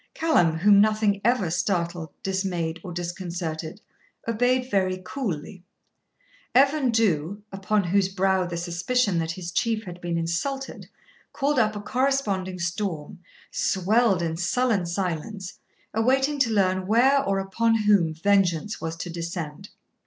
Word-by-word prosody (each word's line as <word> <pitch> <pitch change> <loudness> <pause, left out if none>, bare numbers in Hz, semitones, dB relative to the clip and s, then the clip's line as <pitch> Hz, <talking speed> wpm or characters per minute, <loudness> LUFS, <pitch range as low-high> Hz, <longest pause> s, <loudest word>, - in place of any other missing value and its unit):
Callum, 175 - +3
whom 200 +3 +6
nothing 215 -1 +2
ever 215 -7 +2
startled, 170 -2 -1
dismayed, 180 -4 -2
or 180 - -7
disconcerted, 170 0 -5 0.5
obeyed 245 +3 +1
very 185 -2 +1
coolly. 185 - -5 0.9
Evan 275 0 +4
Dhu, 205 -3 0
upon 195 +1 0
whose 190 +2 +2
brow 190 0 +1
the 170 -1 -4
suspicion 175 +4 0
that 160 -1 -2
his 175 -1 -6
Chief 225 +3 0
had 180 -3 -9
been 175 -1 -2
insulted 220 +12 -3 0.4
called 280 -1 +1
up 215 -2 +2
a 205 - -5
corresponding 210 -7 0
storm, 175 -3 -3 0.3
swelled 195 0 +2
in 165 -1 -2
sullen 200 +1 +1
silence, 180 +2 -4 0.3
awaiting 265 +6 +2
to 250 -4 +3
learn 185 -3 +1
where 265 +6 +4
or 195 -6 0
upon 225 +3 +1
whom 200 -6 +4
vengeance 195 +2 +1
was 165 0 -3
to 170 +2 -6
descend. 170 +1 -5
195 Hz, 130 wpm, -25 LUFS, 175-225 Hz, 0.9 s, whom